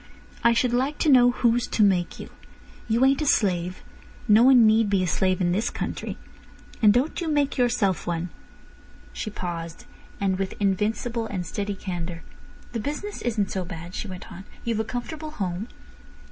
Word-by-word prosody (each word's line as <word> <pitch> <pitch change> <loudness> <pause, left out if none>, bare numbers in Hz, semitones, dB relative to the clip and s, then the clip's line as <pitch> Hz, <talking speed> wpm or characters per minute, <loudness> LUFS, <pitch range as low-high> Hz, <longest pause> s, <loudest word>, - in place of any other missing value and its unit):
"I 235 - +5
should 240 +1 +1
like 265 +4 0
to 310 - +1
know 245 -2 +7
who's 240 0 +1
to 215 - +2
make 185 -4 +1
you. - - -9 0.6
You 235 +4 +4
ain't 275 +2 +3
a - - 0
slave. 180 -6 +1 0.4
No 215 +1 +6
one 250 -2 +7
need 220 0 +4
be 195 -2 +2
a - - 0
slave 185 +2 +1
in 175 -2 +1
this 205 +6 0
country—and 210 -2 -3
don't 260 - 0
you 340 - -2
make 290 -3 +1
yourself 230 -9 +1
one." 175 0 -2 0.8
She 215 - -4
paused, 170 -4 -6 0.3
and 195 -2 0
with 195 -1 -2
invincible 215 +4 0
and 185 -4 -4
steady 205 +3 -3
candour. 175 -3 -5 0.5
"The 235 - -3
business 300 - -4
isn't 215 -5 -1
so 190 - -2
bad," 175 -1 -8
she 215 - -4
went 185 -2 -9
on. 190 +3 -10 0.2
"You've 230 -2 -1
a - - +1
comfortable 305 +7 -5
home." 195 - -4
210 Hz, 175 wpm, -25 LUFS, 185-245 Hz, 0.8 s, know